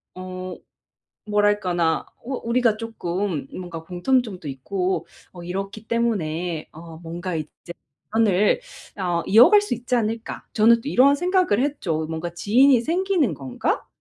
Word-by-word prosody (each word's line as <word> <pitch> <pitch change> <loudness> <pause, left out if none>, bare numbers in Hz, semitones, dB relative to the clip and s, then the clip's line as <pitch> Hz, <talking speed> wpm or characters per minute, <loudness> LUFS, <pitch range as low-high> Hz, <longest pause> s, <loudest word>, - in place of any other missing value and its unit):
어 185 0 -6 0.7
뭐랄까나 205 -6 +1
어 260 - -8
우리가 235 -2 +2
쪼끔 190 -8 -3
뭔가 175 -3 -7
공통점도 190 - -1
있고 180 +8 -2 0.3
어 175 -1 -10
이렇기 195 +4 -5
때문에 180 -8 -1
어 160 0 -11
뭔가 175 +2 -5
이제 155 +2 -7 0.4
'연을 210 - +3 0.4
어 175 -3 0
이어갈 250 - +7
수 415 - -2
있지 245 +2 -3
않을까.' 225 -1 -2
저는 230 +2 +5
또 280 - -5
이런 280 +1 +5
생각을 360 - +2
했죠. 170 - -1
'뭔가 165 +2 -4
지인이 245 +7 +4
생기는 345 - +1
건가.' 135 -4 -3
200 Hz, 270 characters per minute, -23 LUFS, 175-235 Hz, 0.7 s, 이어갈